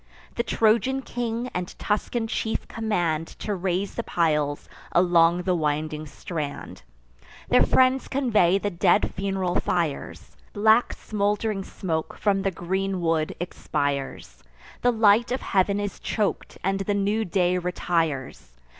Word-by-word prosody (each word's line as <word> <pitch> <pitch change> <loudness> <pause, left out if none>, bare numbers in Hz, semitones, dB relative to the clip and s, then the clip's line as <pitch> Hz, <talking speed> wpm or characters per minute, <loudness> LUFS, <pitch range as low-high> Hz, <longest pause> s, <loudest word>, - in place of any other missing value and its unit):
The - - 0
Trojan 235 +4 +2
king 240 0 -3
and 180 0 -4
Tuscan 225 +2 -1
chief 220 0 -2
command 175 -8 -1
To 210 - -3
raise 190 +1 -1
the - - -2
piles 150 -6 0 0.2
along 175 0 +4
the 185 0 +1
winding 155 -1 -1
strand. 150 -1 -6 0.7
Their - - +5
friends 260 0 +3
convey 215 -9 +3
the 205 +1 -2
dead 170 - +2
fun'ral 190 -2 -1
fires; 165 -5 -3 0.2
Black 220 +3 +4
smould'ring 210 -1 -1
smoke 160 -4 -4
from 200 -2 +1
the 195 - +1
green 190 +1 -2
wood 165 -2 0
expires; 140 - -3 0.4
The 245 - +4
light 225 +1 +4
of 255 - -1
heav'n 200 +1 +1
is 205 -2 -4
chok'd, 210 -2 -2
and 195 +2 0
the 200 +1 -1
new 205 +2 +1
day 180 -1 +1
retires. 165 - -2
190 Hz, 130 wpm, -25 LUFS, 170-215 Hz, 0.7 s, Their